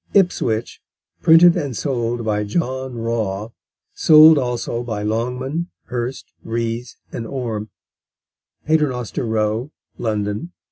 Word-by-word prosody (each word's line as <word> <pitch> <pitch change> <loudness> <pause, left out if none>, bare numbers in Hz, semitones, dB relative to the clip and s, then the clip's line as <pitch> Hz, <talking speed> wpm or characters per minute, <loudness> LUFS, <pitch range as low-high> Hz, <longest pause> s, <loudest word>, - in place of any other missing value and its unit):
Ipswich: 120 - +1 0.4
Printed 170 +1 +7
and 145 -9 -3
sold 120 -4 -2
by 105 -1 0
John 130 +2 -2
Raw; 110 -3 -2 0.4
sold 155 0 +7
also 120 -2 -2
by 110 -4 -4
Longman, 125 +9 -2 0.2
Hurst, 125 +1 -5
Rees, 115 +1 -3
and 115 - -5
Orme, 115 -5 -4 1.0
Paternoster 135 -7 0
Row, 110 +3 0 0.3
London. 105 +8 -2
120 Hz, 100 wpm, -20 LUFS, 110-135 Hz, 1.0 s, Printed